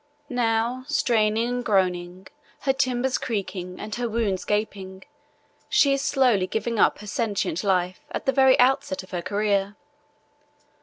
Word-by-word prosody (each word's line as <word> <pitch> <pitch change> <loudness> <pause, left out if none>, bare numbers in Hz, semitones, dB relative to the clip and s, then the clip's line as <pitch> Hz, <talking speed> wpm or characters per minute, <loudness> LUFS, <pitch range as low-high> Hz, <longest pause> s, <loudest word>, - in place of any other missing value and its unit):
Now, 235 +1 0
straining 225 -6 +1
and 245 0 -2
groaning, 185 -3 0 0.4
her 270 - +1
timbers 260 -1 0
cracking 185 -5 -4
and 210 0 -6
her 240 -1 -2
wounds 215 -4 -1
gaping, 195 -3 -3 0.7
she 280 -1 +4
is 275 - 0
slowly 250 -10 +2
giving 220 +3 -2
up - - +4
her - - -9
sentient 205 - -2
life 185 -2 0
at - - -4
the 270 - +3
very 265 -1 +4
outset 275 +3 +2
of - - -16
her 175 -2 -3
career. 200 +1 0
220 Hz, 145 wpm, -24 LUFS, 190-250 Hz, 0.7 s, she